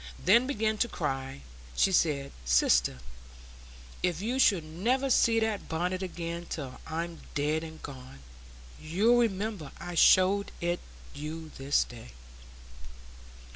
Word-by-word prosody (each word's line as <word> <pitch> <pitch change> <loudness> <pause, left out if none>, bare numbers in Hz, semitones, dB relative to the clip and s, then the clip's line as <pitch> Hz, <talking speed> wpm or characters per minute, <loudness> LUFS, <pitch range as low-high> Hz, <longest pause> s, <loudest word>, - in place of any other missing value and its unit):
Then, 230 +8 +5
beginning 220 -5 0
to 240 - +3
cry, 135 - -4 0.3
she 195 - +3
said, 145 -6 +1
"Sister, - - +3 1.0
if 175 -3 0
you 240 +6 -2
should 195 -10 +4
never 240 +13 0
see 230 -1 +4
that 220 -2 -2
bonnet 180 +3 -1
again 170 -2 -5
till 135 -5 -6
I'm 165 +1 -4 0.2
dead 150 +2 0
and 160 -1 -10
gone, 130 - -9 0.6
you'll 200 +10 +3
remember 205 -8 -1
I 175 - -6
showed 190 +3 +5
it 175 +1 -1 0.3
you 155 +2 -7
this 135 +1 +2
day." 115 - -12
170 Hz, 125 wpm, -29 LUFS, 150-205 Hz, 1.0 s, Then